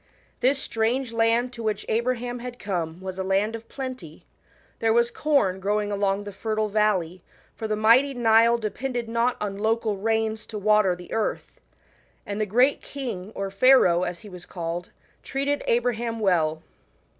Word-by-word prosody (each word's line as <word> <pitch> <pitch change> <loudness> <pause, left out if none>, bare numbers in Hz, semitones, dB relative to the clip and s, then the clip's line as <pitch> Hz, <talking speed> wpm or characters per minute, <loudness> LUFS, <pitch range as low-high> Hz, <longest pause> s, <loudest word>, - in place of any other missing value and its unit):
This 265 +3 +3
strange 230 +1 -1
land 230 +2 +2
to 235 - -8
which 215 -2 -2
Abraham 245 +1 -1
Ijad 245 0 -7
come 175 -5 -4
was 190 0 -6
a - - -1
land 195 +4 +1
of 230 0 -10
plenty; 255 - -7 0.5
thers 225 0 +2
was 235 0 +3
cprn 260 -11 +1
growing 205 +1 -1
along 200 0 0
the 205 - -7
fertile 215 +2 -2
Galley, 190 -5 +1 0.3
for 220 - -4
the 215 - 0
mighty 240 +6 +4
Nile 230 0 +4
de 215 -3 -3
pended 245 -3 -3
not 235 +2 0
on 200 -1 -4
local 220 -1 0
'rains 220 +1 -1
to 215 - -6
water 210 -2 +3
the 180 0 -10
earth. 225 -1 -2 0.7
1 - - -7
And 205 +1 -2
the 215 - 0
greao 250 +7 +3
king, 230 -9 -6
or 195 0 -3
Pharaoh, 195 -6 +5
as 175 -1 -3
he 215 - -12
was 180 -2 -11
called, 175 0 -5 0.3
treated 280 +2 -1
Abraham 235 -1 0
well. 160 -6 +1
220 Hz, 170 wpm, -25 LUFS, 195-235 Hz, 0.7 s, Pharaoh